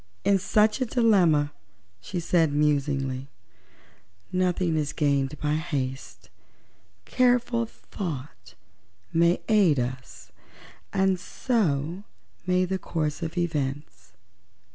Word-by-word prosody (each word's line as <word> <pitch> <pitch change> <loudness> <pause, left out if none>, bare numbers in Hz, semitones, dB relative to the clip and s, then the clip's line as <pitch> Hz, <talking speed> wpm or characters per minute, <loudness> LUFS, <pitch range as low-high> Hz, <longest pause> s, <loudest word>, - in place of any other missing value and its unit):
"In 200 -1 +4
such 215 +5 +2
a - - +2
dilemma," 180 - +3 0.5
said 170 - +1
she, 145 - -4
musingly, 140 -3 0 1.0
"nothing 180 -2 +1
is 150 -1 -1
gained 140 -1 0
by 150 0 0
haste. 140 -5 -4 0.7
Careful 245 -2 +2
thought 130 - -7 0.6
may 170 +2 +3
aid 195 - +4
us, 125 +1 -6 0.6
and 190 -1 +2
so 180 - -1 0.4
may 180 0 +3
the 190 +1 -2
course 155 -4 -3
of 165 +2 -5
events. 140 - -3
160 Hz, 100 wpm, -26 LUFS, 140-190 Hz, 1.0 s, In